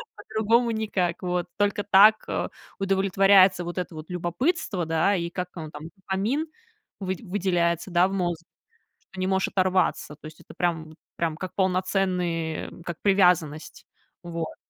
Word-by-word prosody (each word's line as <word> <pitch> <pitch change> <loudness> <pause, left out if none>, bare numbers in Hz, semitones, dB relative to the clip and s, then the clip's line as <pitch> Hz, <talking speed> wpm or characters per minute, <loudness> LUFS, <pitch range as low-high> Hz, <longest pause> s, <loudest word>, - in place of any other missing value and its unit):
По-другому 225 +2 +1
никак 195 -6 -1
вот. 180 -1 -2
Только 205 0 +1
так 205 +2 +6 0.5
удовлетворяется 195 -1 +4
вот 175 +1 -6
это 180 -1 -3
вот 155 0 -9
любопытство, 180 - -1
да, 165 +5 +2
и 170 -2 -2
как 180 +1 -4
он 160 -3 -6
там, 150 +1 -9
дофамин, 200 - -2 0.5
выд 190 -1 -3
выделяется, 180 -3 -1
да, 175 +1 +4
в 195 - -5
мозг, 175 -3 -1 0.6
что 190 - -13
не 185 - 0
можешь 190 0 +1
оторваться. 185 -5 0
То 150 - -16
есть, 155 0 -11
это - - -14
прям 160 -3 -2 0.2
прям 165 -2 -1
как 185 +2 -6
полноценный 180 -4 -1
как 170 -1 -5
привязанность. 180 -6 +2 0.4
Вот. 170 -2 -5
185 Hz, 145 wpm, -25 LUFS, 170-195 Hz, 0.6 s, так